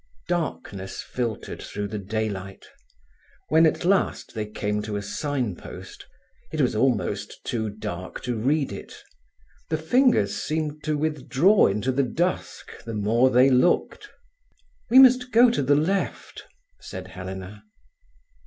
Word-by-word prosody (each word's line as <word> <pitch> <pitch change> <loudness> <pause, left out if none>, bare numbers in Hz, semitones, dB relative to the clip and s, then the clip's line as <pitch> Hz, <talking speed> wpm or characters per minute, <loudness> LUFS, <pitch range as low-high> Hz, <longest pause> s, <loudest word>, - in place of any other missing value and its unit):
Darkness 105 - -3
filtered 115 -4 -4
through 105 0 -5
the 105 +1 -5
daylight. 100 -2 -4 0.8
When 160 +1 +6
at 160 - -1
last 195 +1 +1
they 110 -2 -3
came 105 0 -2
to 105 0 -5
a 100 - -2
signpost, 125 - -5 0.4
it 155 - -4
was 125 -6 +2
almost 105 -4 -1
too 110 -3 -2
dark 100 -3 -6
to 120 -1 -2
read 140 +6 0
it. - - -8 0.7
The 160 - 0
fingers 160 - +2
seemed 155 -1 -3
to 155 -1 0
withdraw 155 +5 +3
into 105 +6 0
the 135 +2 +1
dusk 170 +7 -3
the 115 -1 -6
more 115 +5 +3
they 130 +2 +5
looked. 125 +7 +2 0.8
"We 250 - +5
must 255 -1 +7
go 235 +2 +6
to 240 - 0
the 140 +2 +3
left," 185 +7 -2 0.3
said 95 0 -8
Helena. 95 +2 -8
125 Hz, 135 wpm, -25 LUFS, 105-155 Hz, 0.8 s, must